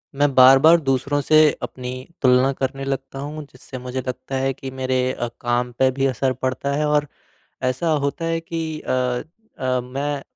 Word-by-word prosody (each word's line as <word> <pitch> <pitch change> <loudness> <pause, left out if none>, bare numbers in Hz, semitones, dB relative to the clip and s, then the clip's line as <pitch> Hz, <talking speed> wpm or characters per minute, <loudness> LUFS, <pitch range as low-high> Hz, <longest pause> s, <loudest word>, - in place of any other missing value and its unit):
मैं 145 0 +2
बार-बार 135 +6 +8
दूसरों 135 +1 0
से 155 +3 +3 0.2
अपनी 125 -1 -6 0.3
तुलना 130 0 +4
करने 135 +1 -3
लगता 135 0 -4
हूँ 150 +2 -6
जिससे 130 +1 -10
मुझे 125 +1 -5
लगता 130 +1 -5
है 135 0 0
कि 135 0 -8
मेरे 130 -1 0
अ, 120 - -3
काम 120 0 0
पे 130 - +5
भी 135 +1 -1
असर 130 0 0
पड़ता 130 +2 -2
है 150 +1 0
और 150 0 +2 0.6
ऐसा 130 +6 0 0.2
होता 140 +4 -2
है 165 0 0
कि 165 -2 -4
अ 125 -1 0 0.4
अ, 130 -1 0
मैं 140 +3 -3
135 Hz, 175 wpm, -21 LUFS, 130-145 Hz, 0.6 s, बार-बार